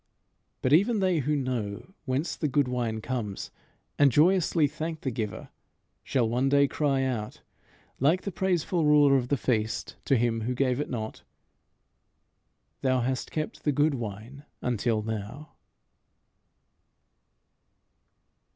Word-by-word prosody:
But 130 - +3
even 205 +7 +4
they 185 -4 +2
who 150 +2 0
know 125 - -3
whence 135 +5 -1
the 155 - -1
good 140 -1 +2
wine 120 -3 -2
comes, 110 -5 -4 0.5
and 145 -2 +6
joyously 165 +2 +4
thank 155 +2 -4
the 130 - -2
giver, 110 -3 -4 0.5
shall 125 -4 +1
one 125 +4 +1
day 140 0 +4
cry 140 -2 0
out, 120 -5 -3 0.6
like 160 +8 +3
the 200 - -3
praiseful 180 -2 0
ruler 150 -2 +5
of 125 -2 +1
the 140 - +1
feast 110 -3 -1
to 135 - +3
him 115 -1 0
who 125 +3 -2
gave 130 0 +1
it 145 - -2
not, 110 -4 -5 1.6
"Thou 130 -2 +2
hast 130 +1 -2
kept 155 -1 -4
the 150 - +2
good 145 +2 +2
wine 120 +3 -6 0.2
until 115 -2 0
now." 110 +7 -6
135 Hz, 135 wpm, -27 LUFS, 120-150 Hz, 1.6 s, and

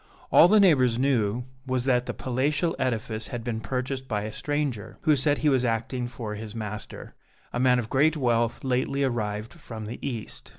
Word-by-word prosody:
All 170 - +8
the 215 +3 +5
neighbors 130 - +5
knew 125 -4 +1 0.2
was 130 -1 -1
that 125 -1 +2
the - - -2
palatial 140 +6 0
edifice 115 -3 -2
had 120 -2 -5
been 115 -2 -3
purchased 130 +3 -3
by 105 -4 -1
a 110 - -4
stranger, 145 -6 -3
who 155 - +4
said 145 +2 +2
he 155 - 0
was 130 -3 +2
acting 120 +1 -1
for 115 -3 -6
his 110 +1 -7
master, 105 -1 -6 0.4
a - - -1
man 125 0 +4
of 120 -3 -2
great 150 +6 +3
wealth 120 -3 +1
lately 135 +2 0
arrived 110 -4 -2
from 115 -10 -8
the 115 +3 -6
east. 120 -6 -5
125 Hz, 185 wpm, -26 LUFS, 115-135 Hz, 0.4 s, All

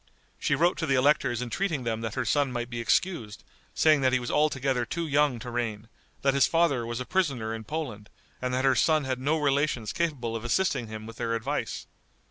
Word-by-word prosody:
She 150 - +1
wrote 170 +5 +2
to 160 - -1
the 135 - +3
electors 130 -3 +2
entreating 155 +2 -2
them 115 -1 -2
that 110 -2 -4
her 130 - -1
son 140 +3 +2
might 120 0 -4
be 120 - -4
excused, 115 - 0 0.3
saying 155 -3 +4
that 130 -1 +3
he 130 - +3
was 120 - -4
altogether 135 -4 +1
too 170 +7 -3
young 145 -3 +2
to 120 +1 -7
reign, 115 -2 -3 0.3
that 135 -1 +3
his 140 -1 +4
father 155 -8 +2
was 120 +1 -3
a 125 - -4
prisoner 135 -12 0
in 110 -1 -6
Poland, 120 -7 -5 0.3
and 125 0 -1
that 130 +1 0
her 135 - +5
son 155 +4 +3
had 130 -1 -2
no 145 +5 +1
relations 140 -6 0
capable 135 -9 -2
of 115 - -4
assisting 120 -1 0
him 110 0 -7
with 115 0 -10
their 115 -1 -1
advice. 135 +6 -3
130 Hz, 215 wpm, -27 LUFS, 115-150 Hz, 0.3 s, her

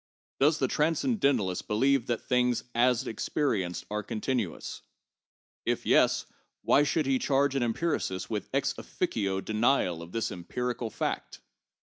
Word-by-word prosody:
Does 150 +3 +4
the 135 - +1
transcendentalist 140 - +1
believe 130 +3 +2
that 120 -2 -1
things 125 -1 +1
as 120 0 +3
experienced 110 - -1
are 105 0 -1
continuous? 110 - -3 0.8
If - - -1
yes, - - +4 0.4
why 140 - +5
should 145 +1 +1
he 135 -1 +2
charge 140 0 +2
an 135 - 0
empiricist 115 - -1
with - - -4
ex - - +1
officio 95 -3 -2
denial 110 -5 +1
of 85 +1 -10
this 115 +1 -2
empirical 120 +6 -3
fact - - -3
125 Hz, 130 wpm, -29 LUFS, 105-140 Hz, 0.8 s, why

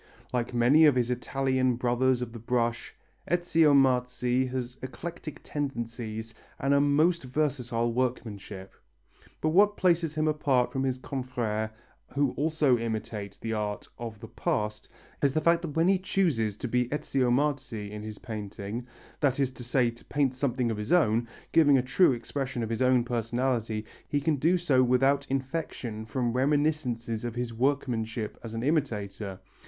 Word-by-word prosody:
Like 120 -1 -1
many 125 +6 +5
of 145 -4 +5
his 125 -1 +1
Italian 130 0 0
brothers 125 +1 +1
of 115 -1 -7
the 115 - -7
brush, 115 0 -1 0.3
Ezio 165 -4 +4
Marzi 125 -1 +2
has 125 0 -4
eclectic 155 +4 -7
tendencies 115 -5 -4 0.3
and 140 +1 +2
a 140 - +5
most 155 +5 +3
versatile 125 -4 -1
workmanship. 105 -6 -3 0.7
But 155 - +2
what 205 +5 +4
places 170 -3 +2
him 155 0 +1
apart 140 -5 +2
from 135 - -1
his 130 -1 0
confrères 125 -5 -3 0.5
who 140 -2 +2
also 150 -4 +2
imitate 110 -3 -4
the 115 0 -2
art 105 -1 -3
of 115 -3 -6
the 115 - -8
past, 105 0 -2 0.3
is 140 0 +2
the - - +4
fact 170 +2 +3
that 160 -4 -6
when 165 +2 +3
he 190 -1 +4
chooses 145 - 0
to 125 - -4
be 125 +1 +1
Ezio 135 -3 0
Marzi 130 -6 -1
in 105 0 -6
his 105 -1 -7
painting, 110 +1 -6 0.3
that 140 -2 +1
is 135 -2 +1
to 130 - -10
say 120 0 +2
to 115 - -17
paint 140 -3 +1
something 125 -2 0
of 110 - -3
his 105 +1 -4
own, 120 -9 +3 0.2
giving 145 -4 +6
a 125 - +1
true 135 +6 +4
expression 125 +1 -3
of 110 - -4
his 115 - -2
own 130 -1 +4
personality, 115 -2 -1 0.2
he 145 - 0
can 145 +1 +1
do 165 +7 +3
so 145 -7 +3
without 135 +3 +3
infection 130 -5 -3
from 120 +1 -1
reminiscences 130 -5 0
of 120 -1 -4
his 120 -1 -3
workmanship 115 -4 -1
as 115 -1 -6
an 115 - -3
imitator. 105 - -1
125 Hz, 165 wpm, -28 LUFS, 115-145 Hz, 0.7 s, giving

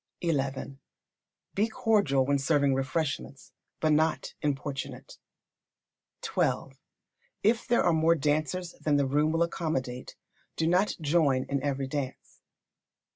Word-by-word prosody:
xi. 165 -2 +2 1.2
Be 210 +3 +2
cordial 200 -12 +2
when 140 +1 +2
serving 140 0 +2
refreshments, 135 +1 -3 0.3
but 155 - +2
not 155 +1 +1
importunate. 145 - -4 1.1
xii. 445 - 0 0.7
If 225 +4 +2
there 240 -1 +3
are 175 - +3
more 160 +1 +4
dancers 155 +4 -1
than 150 -2 +2
the 140 - +2
room 150 +3 +2
will 165 +1 +2
accommodate, 130 -8 -3 0.4
do 160 - 0
not 180 +5 +2
join 145 -4 +2
in 140 -1 -2
every 140 -1 -1
dance. 135 -1 -5
150 Hz, 120 wpm, -28 LUFS, 140-170 Hz, 1.2 s, more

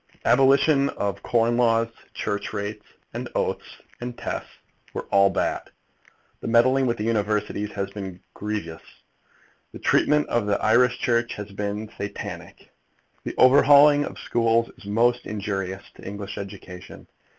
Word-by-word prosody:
Abolition 140 +2 +4
of 100 0 -3
corn 120 +1 +1
laws, 115 -1 +3 0.3
church 100 0 -3
rates, 105 +1 -5 0.3
and - - -5
oaths - - -2 0.2
and 120 0 -6
tests - - -5 0.5
were - - -4
all 100 0 +5
bad. 95 - -2 0.7
The - - -6
meddling 130 +3 +4
with 120 - 0
the 105 - -3
Universities 105 -2 -1
has 100 -1 -3
been 95 -3 -7
grievous. 105 -6 -5 0.9
The - - -7
treatment 150 0 +2
of 120 -3 0
the 100 -1 +1
Irish 125 +2 +3
Church 120 -1 0
has 105 0 -8
been 105 +2 -4
Satanic. 100 - -7 0.5
The - - -4
overhauling 145 +2 +7
of - - -7
schools 115 0 +1
is - - -16
most 120 +4 +1
injurious 100 -2 -4
to - - -16
English 100 0 -6
education. 95 -2 -10
110 Hz, 140 wpm, -24 LUFS, 100-120 Hz, 0.9 s, overhauling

